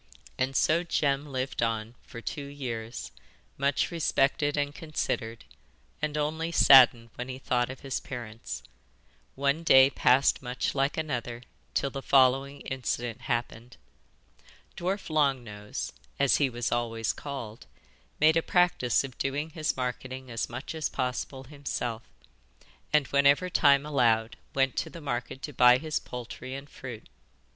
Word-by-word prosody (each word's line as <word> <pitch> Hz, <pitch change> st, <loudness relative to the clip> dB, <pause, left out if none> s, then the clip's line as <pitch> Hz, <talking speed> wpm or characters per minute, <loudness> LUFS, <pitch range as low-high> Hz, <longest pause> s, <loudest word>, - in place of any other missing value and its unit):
And 130 Hz, +1 st, -1 dB
so 160 Hz, +5 st, +3 dB
Jem 145 Hz, -4 st, 0 dB
lived 130 Hz, -1 st, -3 dB
on 115 Hz, -1 st, -1 dB
for 115 Hz, -, -10 dB
two 145 Hz, +4 st, -5 dB
years, 120 Hz, -5 st, -6 dB, 0.4 s
much 140 Hz, +4 st, 0 dB
respected 145 Hz, -3 st, +1 dB
and 145 Hz, 0 st, 0 dB
considered, 115 Hz, -8 st, -3 dB, 0.6 s
and 150 Hz, 0 st, -1 dB
only 160 Hz, +3 st, -1 dB
saddened 120 Hz, -7 st, +7 dB
when 125 Hz, +1 st, -6 dB
he 130 Hz, -, -5 dB
thought 125 Hz, -2 st, 0 dB
of 130 Hz, -, -8 dB
his 135 Hz, -2 st, -3 dB
parents. 115 Hz, -3 st, -7 dB, 0.7 s
One 140 Hz, +3 st, +1 dB
day 135 Hz, -4 st, +7 dB
passed 130 Hz, +1 st, +3 dB
much 125 Hz, 0 st, -2 dB
like 140 Hz, +1 st, 0 dB
another 125 Hz, -6 st, -3 dB, 0.3 s
till 140 Hz, -, 0 dB
the 135 Hz, -, -5 dB
following 135 Hz, +1 st, +3 dB
incident 120 Hz, -3 st, -3 dB
happened. 120 Hz, 0 st, -3 dB, 1.0 s
Dwarf 185 Hz, 0 st, -3 dB
Long 140 Hz, -5 st, +2 dB
Nose 105 Hz, -, -6 dB, 0.2 s
as 140 Hz, -1 st, +4 dB
he 140 Hz, -2 st, +2 dB
was 120 Hz, -1 st, -3 dB
always 115 Hz, -2 st, -1 dB
called 125 Hz, -6 st, -7 dB, 0.5 s
made 155 Hz, +1 st, +5 dB
a 165 Hz, -, +4 dB
practice 175 Hz, -10 st, +2 dB
of 130 Hz, -3 st, -9 dB
doing 145 Hz, +4 st, -2 dB
his 155 Hz, -3 st, -2 dB
marketing 130 Hz, 0 st, -4 dB
as 115 Hz, -, -2 dB
much 120 Hz, +6 st, -6 dB
as 160 Hz, -2 st, -2 dB
possible 130 Hz, +1 st, -3 dB
himself, 130 Hz, -5 st, -4 dB, 0.9 s
and 150 Hz, -2 st, +4 dB
whenever 140 Hz, +6 st, +4 dB
time 140 Hz, -2 st, +4 dB
allowed 115 Hz, -6 st, +2 dB, 0.2 s
went 135 Hz, -1 st, +2 dB
to -, -, -1 dB
the 170 Hz, -, -10 dB
market 130 Hz, -2 st, -4 dB
to 150 Hz, -, -5 dB
buy 125 Hz, 0 st, +7 dB
his 155 Hz, +2 st, -2 dB
poultry 125 Hz, +1 st, -7 dB
and 140 Hz, +1 st, -9 dB
fruit. 125 Hz, -4 st, -9 dB
135 Hz, 145 wpm, -28 LUFS, 120-145 Hz, 1.0 s, saddened